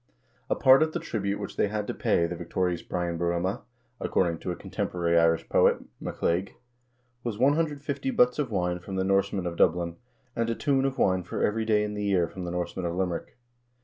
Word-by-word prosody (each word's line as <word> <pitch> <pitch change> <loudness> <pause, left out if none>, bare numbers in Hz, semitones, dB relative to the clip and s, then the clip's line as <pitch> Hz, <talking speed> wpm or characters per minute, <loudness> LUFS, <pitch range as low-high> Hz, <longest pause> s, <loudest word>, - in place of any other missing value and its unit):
A - - +2
part 130 +2 +6
of 155 0 +2
the - - -1
tribute 100 -2 -2
which - - -6
they - - +3
had 105 0 -2
to - - -3
pay 85 - +2
the 85 +1 -3
victorious 90 0 -1
Brian 85 -2 -3
Bo 85 - 0
rumha, 85 +5 -1 0.4
according 85 -3 0
to - - -5
a 90 - -2
contemporary 85 -1 -2
Irish 85 0 +3
poet, - - +4 0.2
Mac - - -7
Liag, 90 +4 +1 0.7
was 115 -4 -3
150 140 0 +1
butts 125 +1 +3
of 140 -5 0
wine 90 -4 -1
from 95 +2 -7
the 95 - +1
Norsemen 100 -1 +1
of 85 -1 -3
Dublin, 85 0 +2 0.4
and 115 0 0
a 115 - 0
tun 135 0 +1
of 135 -1 -1
wine 95 -1 +2
for 90 - -3
every 110 +1 +1
day 105 -1 +3
in 105 0 -3
the 105 0 -3
year 95 -4 +2
from 90 +1 -7
the 85 - -4
Norsemen 90 0 -3
of 85 - -3
Limerick. 90 +3 -3
95 Hz, 215 wpm, -27 LUFS, 85-115 Hz, 0.7 s, part